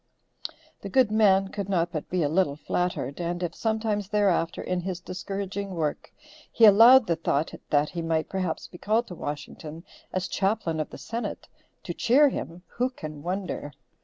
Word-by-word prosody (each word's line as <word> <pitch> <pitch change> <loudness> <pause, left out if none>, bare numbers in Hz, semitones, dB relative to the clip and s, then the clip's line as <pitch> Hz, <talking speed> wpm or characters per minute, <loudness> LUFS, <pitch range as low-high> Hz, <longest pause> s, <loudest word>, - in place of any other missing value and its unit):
The - - -6
good 255 -5 +3
man 195 -3 +4
could 200 -1 -5
not 175 -3 +1
but 155 - -5
be 180 -2 0
a - - +2
little 155 -2 +1
flattered, 165 -2 -2
and 175 +1 -2
if 170 -1 -2
sometimes, 220 -2 -1
thereafter, 195 -5 +1
in 180 0 -1
his 180 -1 -4
discouraging 195 +1 -5
work, 155 -3 -3 0.4
he 230 - +6
allowed 230 +5 +8
the 170 - +1
thought 155 -1 -1 0.2
that 145 0 +2
he 170 - -4
might 165 -1 0
perhaps 185 -4 -3
be 175 - -12
called 220 +3 +1
to 180 - -7
Washington 150 +2 -7 0.3
as 185 0 -2
chaplain 190 -5 -1
of 155 - -2
the - - -10
Senate, 230 +1 -5 0.4
to - - -4
cheer 275 +5 +4
him, 175 -8 -6
who 250 +1 -1
can 155 - -8
wonder. 180 -4 -4
185 Hz, 175 wpm, -26 LUFS, 165-210 Hz, 0.4 s, allowed